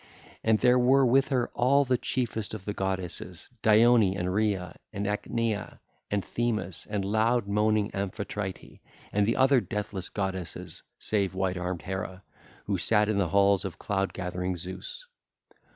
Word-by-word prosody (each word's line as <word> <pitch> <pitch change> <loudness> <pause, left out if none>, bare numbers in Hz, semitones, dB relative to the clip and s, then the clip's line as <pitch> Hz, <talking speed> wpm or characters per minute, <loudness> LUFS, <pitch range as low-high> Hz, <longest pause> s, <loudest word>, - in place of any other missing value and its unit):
And 110 -1 +4
there 125 +2 +4
were 130 +2 +5
with 135 +2 +4
her 125 -3 0
all 140 +3 +3
the 130 0 +2
chiefest 115 -4 -2
of 95 -3 -9
the 105 - -2
goddesses, 95 -3 -4
Dione 110 -2 +5
and 90 0 -1
Rhea 100 -4 0 0.2
and 100 -1 -3
Ichnaea 110 +1 -2 0.3
and 100 -3 -1
Themis 110 -7 -2
and 105 -2 -1
loud 110 +2 +2
moaning 105 0 +2
Amphitrite 100 0 -5 0.3
and 105 0 +2
the 115 - +2
other 130 -1 +4
deathless 105 -4 -4
goddesses 95 -3 -4 0.2
save 100 -3 0
white 95 -1 0
armed 90 -1 -3
Hera, 95 0 -5 0.4
who 100 -3 -1
sat 105 +5 +3
in 105 -2 +1
the 90 -4 +1
halls 100 +1 +4
of 90 -4 -5
cloud 100 -1 -1
gathering 90 0 -3
Zeus. 95 - -6
100 Hz, 150 wpm, -28 LUFS, 95-115 Hz, 0.4 s, were